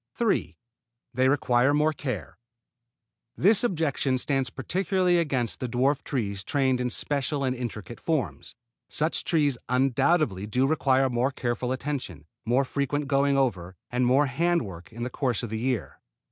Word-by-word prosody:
3. 230 -4 0 0.6
They 130 +2 +3
require 130 0 +3
more 155 +1 +2
care. 125 - -5 1.0
This 205 +5 +4
objection 155 - 0
stands 135 -1 0
particularly 180 - +1
against 130 -8 -1
the 125 - -3
dwarf 135 +4 +1
trees 100 -8 -3
trained 130 -2 +1
in 125 - 0
special 140 +2 -1
and 130 -1 0
intricate 120 -2 -6
forms. 110 - -2 0.3
Such 155 +2 0
trees 145 -6 +1
undoubtedly 125 - +2
do 125 +5 +1
require 135 -3 +2
more 125 +1 +1
careful 125 -1 -2
attention, 130 - -4 0.2
more 125 +4 +2
frequent 140 +2 -2
going 140 0 +2
over, 95 -9 -1 0.2
and 125 +1 +1
more 135 +4 +4
hand 170 +4 +1
work 85 -5 -9
in 120 +1 -6
the 125 - -3
course 125 -4 -1
of 115 - -5
the 110 - -2
year. 125 -1 -2
130 Hz, 150 wpm, -26 LUFS, 120-145 Hz, 1.0 s, This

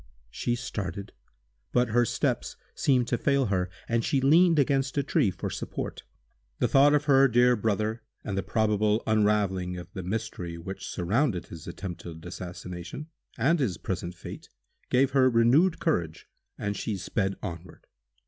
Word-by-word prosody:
She 120 - -1
started, 100 -5 -5 0.6
but 125 -1 +2
her 120 +2 +3
steps - - -1 0.2
seemed 125 -4 +2
to 120 - 0
fail 140 -2 +2
her, 90 -1 0 0.2
and 115 0 +1
she 140 - +1
leaned 165 +5 +5
against 135 -1 +1
a 140 - +2
tree 140 -5 +2
for 90 - -5
support. - - -5 0.6
The - - +2
thought 145 +2 +5
of 145 0 +1
her 135 -1 +6
dear 125 0 +4
brother, 110 +1 -1 0.2
and 100 - -3
the 95 - 0
probable 105 +1 +1
unraveling 105 -4 +1
of 90 +1 -10
the 95 - -5
mystery 90 -3 -4
which 95 +3 -7
surrounded 100 - 0
his 80 -1 -10
attempted 85 -2 -7
assassination, 90 - -7 0.3
and 150 +8 +3
his 110 -11 0
present 90 -1 -4
fate, 90 - -9 0.4
gave 130 +1 +3
her 130 -1 +5
renewed 130 +10 +4
courage, 85 - -1 0.3
and 100 0 -2
she 105 -1 -3
sped 95 +1 -1
onward. 85 -3 -8
110 Hz, 155 wpm, -27 LUFS, 90-135 Hz, 0.6 s, her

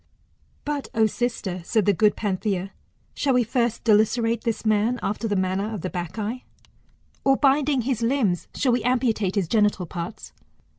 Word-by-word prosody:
"But 290 -1 -3
O 220 -1 +4
sister, 215 -5 -2
said 215 +2 +1
the 205 - +4
good 210 +3 +3
Panthia, 195 -2 -2 0.4
shall 270 -3 +1
we 250 - +4
first 235 0 -1
dilacerate 225 +1 +2
this 230 -1 -2
man 215 +3 +2
after 210 +3 -2
the 205 - 0
manner 190 +3 -1
of 210 -5 -5
the 185 - -4
Bacchae^^, 205 +8 -4 0.8
or, 270 0 +4
binding 280 -1 +3
his 245 -1 -2
limbs, 230 -7 +1
shall 260 - +1
we 240 0 +1
amputate 230 -6 +1
his 195 -5 0
genital 210 -2 +2
parts 170 +4 -7
220 Hz, 160 wpm, -24 LUFS, 200-245 Hz, 0.8 s, O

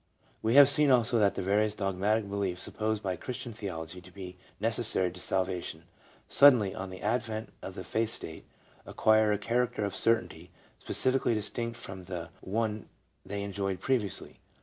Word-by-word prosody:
We 110 +3 +1
have 140 -1 +10
seen 145 +1 +4
also 120 -2 +4
that 100 -2 +3
various 105 +3 +1
dogmatic 100 +2 0
beliefs 100 -3 -2
supposed 110 -1 -2
by 95 -2 -1
Christian 125 -1 -5
theology 90 -4 -6
to 95 +1 -15
be 90 -1 -9 0.2
necessary 110 -4 +1
to 90 - -11
Salvation, 90 -3 -2 0.4
suddenly, 125 -9 +6
on 95 0 -6
the 95 0 -9
advent 110 0 -2
of - - -7
the - - -6
faith 110 0 0
state, 80 -8 -5 0.4
acquire 110 -1 +3
a 105 - +2
character 115 0 0
of 100 -4 -3
certainty 90 -6 0 0.3
specifically 130 -2 +1
distinct 115 +2 -3
from 95 -5 -8
the 85 -2 -6
one 110 0 -2 0.3
they 100 0 -4
enjoyed 100 -1 -3
previously. 115 -8 -2
105 Hz, 155 wpm, -30 LUFS, 95-115 Hz, 0.4 s, have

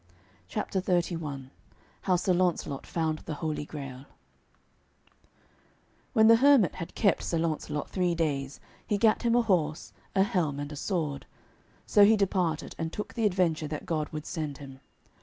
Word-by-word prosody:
CHAPTER 200 -3 -2
XXXI 165 -7 -2 0.5
HOW 185 - +2
SIR 180 +1 +1
LAUNCELOT 175 -6 0
FOUND 160 -2 -1
THE 155 - -6
HOLY 155 -1 -3
GRAIL 135 -2 -8 2.1
When 220 -3 +5
the 230 +1 +8
hermit 265 - +5
had 165 -2 -7
kept 200 -4 +2
Sir 170 - -1
Launcelot 155 -3 -2
three 180 -2 0
days, 140 -4 -2 0.3
he 205 - +1
gat 215 +1 +3
him 235 -1 +2
a 240 - +4
horse, 165 -7 0 0.2
a 190 - +5
helm, 175 -9 -1
and 145 +1 -5
a - - -6
sword. 150 -4 -3 0.6
So 205 - +5
he 215 +2 +6
departed, 185 -5 0
and 160 0 -2
took 210 - -6
the 225 -3 +2
adventure 175 -5 0
that 150 0 -5
God 155 -3 -2
would 155 0 -6
send 150 -5 -4
him. 135 -2 -11
165 Hz, 160 wpm, -28 LUFS, 150-195 Hz, 2.1 s, the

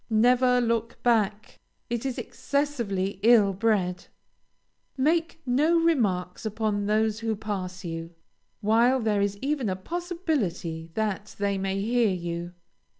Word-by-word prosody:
Never 250 +3 +4
look 230 -1 -1
back! 215 -3 +1 0.3
It 235 +2 -2
is 260 - -4
excessively 235 -10 -2
ill 215 -3 +5
bred. 190 -3 0 0.9
Make 325 +4 +1
no 295 +7 +3
remarks 205 - +1
upon 210 -2 -1
those 215 0 +1
who 225 -1 -1
pass 185 -3 -5
you, 165 0 -6 0.5
while 230 +5 +4
there 215 -3 +1
is 200 0 0
even 275 -6 0
a 185 - -1
possibility 230 - -3
that 210 -2 -2
they 200 -1 0
may 195 0 -1
hear 235 +1 +2
you. 175 -1 -4
215 Hz, 125 wpm, -26 LUFS, 195-250 Hz, 0.9 s, ill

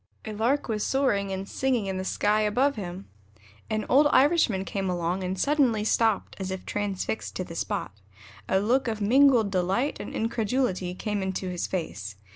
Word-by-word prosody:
A 215 - -5
Lark 235 +7 0
was 215 -3 -1
soaring 205 -8 +1
and 190 +1 -4
singing 255 -4 0
in 190 -1 -3
the - - -3
sky 210 +3 +1
above 250 +7 +2
him. 185 -2 -6 0.6
An 215 -1 -1
old 290 +3 +5
Irishman 265 - +3
came 195 -1 -2
along 175 +1 -1
and 185 +1 -2
suddenly 265 -7 +2
stopped 220 -1 +1
as 190 -1 -3
if 190 0 -5
transfixed 205 +1 -3
to 185 - -2
the 170 - -9
spot. 165 - -3 0.6
A 190 - +3
look 240 +6 +1
of 220 -2 -2
mingled 240 -1 +4
delight 190 +9 0
and - - -6
incredulity 220 -5 -1
came 210 0 -2
into 190 0 -3
his 180 -1 -3
face. 105 - -4
210 Hz, 175 wpm, -26 LUFS, 190-240 Hz, 0.6 s, old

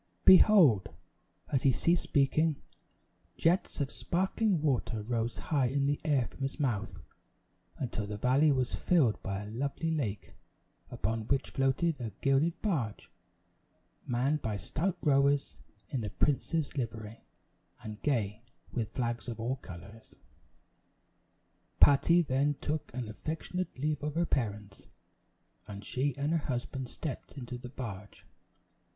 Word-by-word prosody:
Behold! 175 - +7 0.6
As 135 - +2
he 135 - +4
ceased 170 +7 +2
speaking, 150 +2 +2 0.8
jets 175 +3 +1
of 140 -2 -1
sparkling 190 +2 0
water 125 -7 0
rose 115 +1 -2
high 140 -5 +1
in 140 +2 0
the 145 +1 0
air 140 -5 +2
from - - -12
his 135 +3 -3
mouth, 110 - -1 0.8
until 110 -5 -3
the 105 0 -5
valley 135 +7 +4
was 130 -2 0
filled 145 -12 +2
by 100 0 -3
a 105 - -8
lovely 140 +7 -2
lake, 115 -11 -3 0.6
upon 110 +2 -2
which 140 0 0
floated 135 +3 +1
a 115 - -3
gilded 140 +5 +2
barge, 140 - -2 1.0
manned 135 +5 +1
by 110 -2 -2
stout 175 - -2
rowers 140 -1 +3 0.3
in 130 - -2
the 105 - -3
prince's 150 +6 0
livery, 115 -4 -5 0.6
and 105 -1 -7
gay 110 -7 0 0.3
with 115 -4 -3
flags 120 -1 -2
of 115 -2 -5
all 125 +4 -1
colors. 100 +3 -12 1.6
Patty 155 +5 +6
then 145 +1 +1
took 150 0 -3
an 125 -3 -3
affectionate 160 +10 -4
leave 150 +2 -1
of 150 0 -3
her 170 +1 +2
parents, 105 -8 -2 0.9
and 100 0 -8
she 135 +4 -1
and 145 +2 0
her 165 -3 0
husband 130 0 -3
stepped 150 -1 -6
into 125 -1 -6
the 125 - -8
barge. 105 -6 -8
135 Hz, 135 wpm, -31 LUFS, 115-150 Hz, 1.6 s, Behold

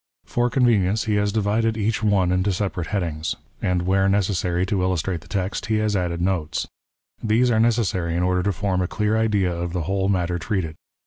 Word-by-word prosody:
For 120 0 0
convenience 110 -5 +2
he 110 - -2
X - - +2
PREFACE. - - +3
has 105 0 +1
divided 110 +1 +1
each 110 +1 0
one 100 -4 +2
into 95 +2 +1
separate 95 -3 -2
headings; 85 -5 -2 0.3
and 90 -1 0
wliere 95 +1 +3
necessary 95 -3 +1
to 95 0 -1
illustrate 90 -1 -1
the 85 - -17
text, 95 +2 -3
he 110 - +1
has 105 -1 +1
added 90 -2 -1
notes. 90 -4 -1 0.6
These 115 +3 +3
are 110 - +2
necessary 105 -7 +1
in 90 - +1
order 90 0 +2
to 100 - +1
form 95 +1 -1
a 90 - 0
clear 105 +3 0
idea 105 -5 +1
of 85 0 -4
the 90 -3 -1
whole 95 +3 0
matter 90 -2 0
treated. 85 -2 -2
95 Hz, 205 wpm, -23 LUFS, 90-105 Hz, 0.6 s, PREFACE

